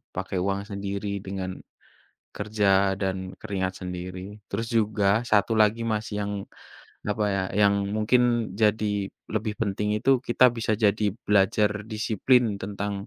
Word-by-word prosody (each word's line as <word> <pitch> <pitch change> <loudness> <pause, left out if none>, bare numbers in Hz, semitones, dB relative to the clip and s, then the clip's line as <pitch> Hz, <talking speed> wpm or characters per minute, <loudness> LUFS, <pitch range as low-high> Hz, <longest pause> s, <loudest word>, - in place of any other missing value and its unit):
pakai 95 0 -3
uang 100 +2 0
sendiri 100 +1 -4 0.2
dengan 95 -1 -4 0.9
kerja 105 0 -1 0.3
dan 95 -1 0 0.2
keringat 95 -2 -2
sendiri. 90 +3 -6
Terus 115 - -3
juga 105 -2 +1 0.2
satu 105 +2 +3
lagi 110 +2 +3
Mas 110 +1 -2
yang 105 0 -2 0.7
apa 105 0 0
ya, 95 - 0 0.2
yang 100 0 +5 0.2
mungkin 110 +4 +3 0.4
jadi 110 0 +2 0.5
lebih 110 -1 -1
penting 105 -1 -1
itu 135 - +2 0.2
kita 125 +2 +4
bisa 110 -1 0
jadi 105 +1 +3 0.2
belajar 105 +1 +3 0.2
disiplin 110 +1 +2
tentang 100 +1 -3
105 Hz, 130 wpm, -26 LUFS, 100-110 Hz, 0.9 s, yang